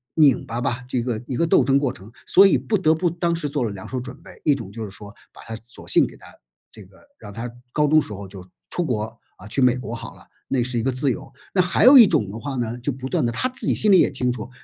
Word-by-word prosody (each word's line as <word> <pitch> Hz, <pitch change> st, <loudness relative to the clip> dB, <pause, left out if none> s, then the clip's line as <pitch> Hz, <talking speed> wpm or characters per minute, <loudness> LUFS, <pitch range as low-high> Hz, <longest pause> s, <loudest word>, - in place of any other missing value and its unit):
拧 145 Hz, -6 st, +4 dB
巴 115 Hz, -, -4 dB
吧， 125 Hz, 0 st, -2 dB
这 125 Hz, -2 st, -1 dB
个 115 Hz, -3 st, -3 dB
一 130 Hz, -, -3 dB
个 170 Hz, -, +2 dB
斗 160 Hz, -, +4 dB
争 135 Hz, +2 st, +3 dB
过 140 Hz, -3 st, 0 dB
程， 100 Hz, 0 st, -13 dB
所 195 Hz, +1 st, +6 dB
以 -, -, +3 dB
不 220 Hz, -, -2 dB
得 160 Hz, -5 st, +3 dB
不 175 Hz, +3 st, 0 dB
当 170 Hz, 0 st, -1 dB
时 165 Hz, -3 st, -3 dB
做 140 Hz, -2 st, -2 dB
了 115 Hz, -, -1 dB
两 100 Hz, -2 st, -8 dB
手 130 Hz, -, -4 dB
准 130 Hz, +2 st, -8 dB
备。 -, -, -13 dB
一 145 Hz, -, +3 dB
种 115 Hz, -7 st, -8 dB
就 110 Hz, +2 st, -7 dB
是 105 Hz, -, -6 dB
说 100 Hz, +2 st, -10 dB, 0.2 s
把 -, -, -15 dB
她 115 Hz, -, -7 dB
索 115 Hz, +2 st, -13 dB
性 -, -, +4 dB
给 -, -, -14 dB
她 -, -, -17 dB, 0.5 s
这 105 Hz, -, -12 dB
个 95 Hz, -, -22 dB, 0.2 s
让 -, -, -10 dB
她 115 Hz, +4 st, -6 dB, 0.2 s
高 150 Hz, +2 st, +1 dB
中 155 Hz, +1 st, +4 dB
时 110 Hz, -, -8 dB
候 100 Hz, -1 st, -7 dB
就 95 Hz, -1 st, -11 dB, 0.3 s
出 175 Hz, -, -1 dB
国， 120 Hz, -9 st, -1 dB, 0.3 s
呃， 95 Hz, -, -13 dB
去 120 Hz, +6 st, -1 dB
美 125 Hz, -1 st, +4 dB
国 125 Hz, -2 st, -6 dB
好 115 Hz, -, -8 dB
了， -, -, -18 dB, 0.2 s
那 130 Hz, -3 st, 0 dB
是 120 Hz, 0 st, -1 dB
一 -, -, -1 dB
个 135 Hz, +4 st, 0 dB
自 130 Hz, +2 st, +1 dB
由， 135 Hz, -, -7 dB, 0.2 s
那 185 Hz, -, +4 dB
还 180 Hz, +2 st, +1 dB
有 265 Hz, +1 st, +10 dB
一 230 Hz, -, +9 dB
种 105 Hz, -, +1 dB
的 110 Hz, -, -7 dB
话 140 Hz, +2 st, -5 dB
呢， 120 Hz, -1 st, -3 dB
就 125 Hz, +4 st, -2 dB
不 130 Hz, 0 st, -7 dB
断 -, -, -1 dB
地 120 Hz, -, 0 dB
她 255 Hz, -, 0 dB
自 255 Hz, -, -1 dB
己 -, -, +2 dB
心 210 Hz, -, +3 dB
里 190 Hz, -, +7 dB
也 -, -, +4 dB
清 125 Hz, -2 st, 0 dB
楚， 120 Hz, -1 st, -6 dB
125 Hz, 320 characters per minute, -22 LUFS, 115-150 Hz, 0.5 s, 有